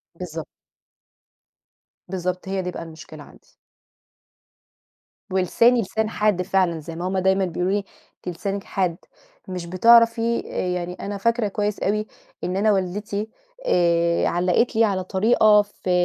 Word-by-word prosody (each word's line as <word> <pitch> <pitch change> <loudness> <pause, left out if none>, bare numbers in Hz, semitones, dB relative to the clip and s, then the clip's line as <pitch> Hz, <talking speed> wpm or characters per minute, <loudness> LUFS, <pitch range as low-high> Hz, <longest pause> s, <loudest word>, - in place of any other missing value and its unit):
بالضبط. 165 -3 -6 1.6
بالضبط 180 0 -3
هي 195 -1 -1
دي 180 0 -4
بقى 170 - -6
المشكلة 160 -1 -11
عندي. - - -18 1.9
ولساني 230 +6 +3
لسان 220 +2 -2
حاد 210 -4 +1
فعلًا، 185 -3 +1
زي 165 +2 -8
ما 175 +2 -3
هم 190 0 -1
دايمًا 190 +1 +2
بيقولوا 180 +1 -1
لي، 205 -1 0 0.4
أنتِ 175 -2 -4
لسانِك 195 +2 -3
حاد، 180 -4 -1 0.5
مش 180 -2 -5
بتعرفي 230 +5 +4 0.3
يعني 180 0 -3
أنا 200 +2 -5
فاكرة 230 +2 +1
كويس 205 +1 -2
أوي 215 +2 -1 0.4
إن 180 +1 -2
أنا 210 +2 +3
والدتي، 200 +3 -2 0.4
آآ، 170 - +2
علَّقت 180 +7 +1
لي 225 - +4
على 195 -3 +1
طريقة 210 +2 +4
في 205 -2 -8
190 Hz, 135 wpm, -23 LUFS, 180-210 Hz, 1.9 s, بتعرفي